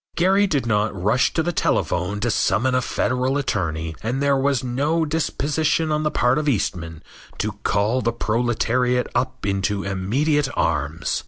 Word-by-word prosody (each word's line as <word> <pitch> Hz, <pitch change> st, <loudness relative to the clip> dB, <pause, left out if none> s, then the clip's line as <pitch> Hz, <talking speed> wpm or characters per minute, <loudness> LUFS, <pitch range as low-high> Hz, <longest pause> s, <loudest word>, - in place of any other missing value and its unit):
Gary 195 Hz, +3 st, +3 dB
did 145 Hz, -8 st, 0 dB
not 105 Hz, -3 st, 0 dB
rush 105 Hz, +8 st, +2 dB
to 160 Hz, -, 0 dB
the 175 Hz, -, 0 dB
telephone 100 Hz, -, 0 dB
to 120 Hz, +3 st, 0 dB
summon 130 Hz, +4 st, +1 dB
a 130 Hz, -, +2 dB
Federal 130 Hz, +2 st, 0 dB
attorney, 85 Hz, -, -2 dB
and 120 Hz, +4 st, -2 dB
there 140 Hz, 0 st, +2 dB
was 135 Hz, -2 st, +1 dB
no 145 Hz, +7 st, 0 dB
disposition 155 Hz, 0 st, 0 dB
on 150 Hz, 0 st, +1 dB
the 155 Hz, -, +1 dB
part 125 Hz, 0 st, +2 dB
of 150 Hz, -1 st, 0 dB
Eastman 85 Hz, -, -2 dB, 0.3 s
to 105 Hz, -, -1 dB
call 105 Hz, +6 st, +1 dB
the 115 Hz, -, +1 dB
proletariat 120 Hz, +2 st, 0 dB
up -, -, -2 dB
into 100 Hz, 0 st, -1 dB
immediate 135 Hz, +11 st, 0 dB
arms. 75 Hz, +1 st, -1 dB
125 Hz, 160 wpm, -22 LUFS, 100-145 Hz, 0.3 s, Gary